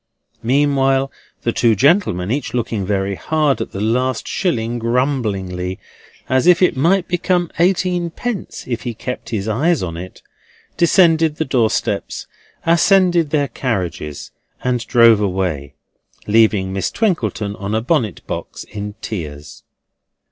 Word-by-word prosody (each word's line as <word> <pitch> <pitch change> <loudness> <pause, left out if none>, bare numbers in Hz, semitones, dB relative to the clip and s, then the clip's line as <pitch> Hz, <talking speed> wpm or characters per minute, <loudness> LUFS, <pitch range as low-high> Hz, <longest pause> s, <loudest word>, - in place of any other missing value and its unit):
Meanwhile 135 +1 +2 0.3
the 120 - +1
two 115 -1 +3
gentlemen, 110 - +2
each 140 -1 -2
looking 110 -5 -2
very 100 -1 0
hard 150 +6 0
at - - -4
the 95 - -6
last 120 +3 0
shilling 120 - -1
grumblingly, 105 -8 -1 0.5
as 130 +5 +2
if 180 -1 +6
it 180 - +3
might 175 +7 +2
become 175 -1 0
eighteen 180 -1 +2
pence 220 +4 -5
if 120 -2 -3
he 120 -2 -4
kept 125 0 -6
his 110 -3 -3
eyes 145 - +1
on 85 -2 -4
it, 90 +2 -9 0.5
descended 165 -3 +4
the 160 - -2
doorsteps, 120 -5 -1 0.4
ascended 175 -1 +4
their 145 -2 +1
carriages, 90 - -3 0.3
and 125 -2 -1
drove 115 -3 +6
away, 90 -8 -2 0.5
leaving 105 -3 +3
Miss 95 - -1
Twinkleton 110 - -1
on 100 +2 -3
a - - +2
bonnet 120 -4 -1
box - - -6
in 105 0 -7
tears. 75 -8 -6
120 Hz, 135 wpm, -18 LUFS, 100-160 Hz, 0.5 s, if